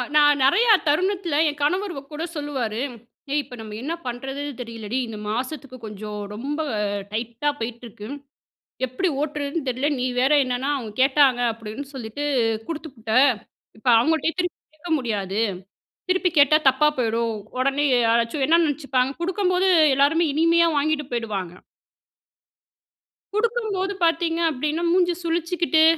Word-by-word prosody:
நான் 290 -1 +5
நிறையா 440 - +5 0.2
தருணத்தில 360 +1 +1
என் 295 0 -7
கணவர் 370 +6 0
வ - - -2
கூட 305 +2 -4
சொல்லுவாரு, 265 -7 -3 0.5
"ஏய்! 295 - +2
இப்ப 250 -1 -11
நம்ம 215 -1 -8
என்ன 310 +5 -3
பண்றதுன்னு 270 +4 -4
தெரியலடி, 230 0 -5
இந்த 220 -1 -7
மாசத்துக்கு 255 +3 -4
கொஞ்சம் 210 0 -7
ரொம்ப 275 +8 -4 0.5
டைட்டா 235 +6 -2
போய்ட்டிருக்கு. 225 -2 -7 0.8
எப்படி 255 +9 -1
ஓட்டுறதுன்னு 295 0 -3
தெரியல. 255 +3 0
நீ 255 - 0
வேற 265 +3 +3
என்னன்னா 255 +2 -2
அவுங்க 225 -6 -6
கேட்டாங்க 270 -2 +4
அப்படின்னு 225 +4 -7
சொல்லிட்டு 240 +3 -6 0.5
குடுத்துபுட்ட. 275 -9 -6 0.7
இப்ப 235 - -3
அவுங்கள்ட்டயே 320 +5 +1
திருப்பி 355 -2 -2 0.2
கேட்க 320 +3 -9
முடியாது. 205 -5 -2 0.7
திருப்பி 370 0 +2
கேட்டா 290 +2 +6
தப்பா 265 +3 +3
போயிடும். 230 -1 0 0.3
உடனே 275 +2 +1 0.2
யாராச்சும் 235 +4 +1
என்ன 335 +1 +5
நினைச்சுப்பாங்க," 275 -3 0
குடுக்கும்போது 370 0 +1 0.3
எல்லாருமே 300 +5 +3
இனிமையா 335 +2 +4
வாங்கிட்டு 295 0 0
போயிடுவாங்க. 200 -7 -3 1.8
குடுக்கும்போது 425 -4 0
பார்த்தீங்க 330 0 +1
அப்படினா, 305 +4 -2
மூஞ்சி 355 0 +3
சுளிச்சுக்கிட்டு, 335 -1 +1
285 Hz, 125 wpm, -23 LUFS, 235-330 Hz, 1.8 s, கேட்டா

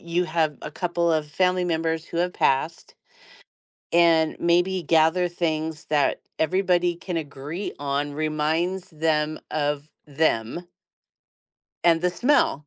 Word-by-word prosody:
you 170 +1 -1
have 155 -3 0
a 150 - -6
couple 170 +1 -1
of 155 -1 0
family 180 +4 +1
members 165 -1 -1
who 170 - -5
have 180 +1 0
passed, 140 +5 0 1.0
and 165 -2 +4
maybe 175 +2 +2
gather 165 +3 +3
things 160 -2 -2
that 150 -2 +1 0.2
everybody 175 0 +2
can 175 0 -6
agree 150 +5 -5
on 145 +1 -2
reminds 155 +5 -1
them 155 -1 0
of 145 0 -2 0.2
them. 150 +1 -1 1.2
And 165 -1 +5
the 180 +1 +1
smell. 180 - +1
160 Hz, 125 wpm, -24 LUFS, 150-175 Hz, 1.2 s, And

